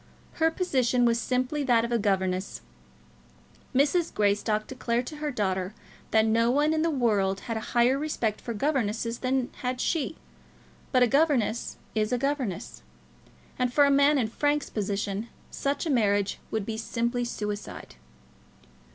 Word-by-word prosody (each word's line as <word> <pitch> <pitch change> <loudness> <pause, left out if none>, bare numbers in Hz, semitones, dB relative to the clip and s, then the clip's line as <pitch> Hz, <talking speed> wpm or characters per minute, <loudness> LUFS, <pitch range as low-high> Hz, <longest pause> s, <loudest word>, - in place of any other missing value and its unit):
Her 320 - +5
position 255 -8 +1
was 235 -1 +3
simply 255 +4 -1
that 235 -3 +3
of 235 - -5
a 235 - +2
governess. 190 -2 -1 1.1
Mrs. 300 +6 +2
Greystock 210 +1 +1
declared 245 -2 -2
to 300 - -7
her 300 0 -2
daughter 190 -5 -2 0.3
that 220 0 +4
no 230 +1 +3
one 295 +4 +3
in 315 - +1
the 330 - +2
whole 300 - -2
world 195 -5 +1
had 230 - -4
a - - -1 0.2
higher 250 +3 +4
respect 240 -8 -2
for 235 - -5
governesses 230 -3 -1
than 255 -1 0
had 250 0 -3
she. 320 +2 -1 0.8
But 255 -2 +5
a - - +5
governess 265 -5 +1 0.2
is 215 0 0
a 250 - +2
governess; 245 - -3 0.8
and 250 -1 +1
for 290 +2 +5
a 280 - +3
man 280 +1 +5
in 240 -5 +1
Frank's 290 +4 0
position 200 +1 -2 0.2
such 280 +3 -2
a - - -2
marriage 205 -5 +1
would 220 -3 -2
be 220 0 -4
simply 235 +2 -1
suicide. 210 -3 -5
240 Hz, 160 wpm, -27 LUFS, 215-275 Hz, 1.1 s, Her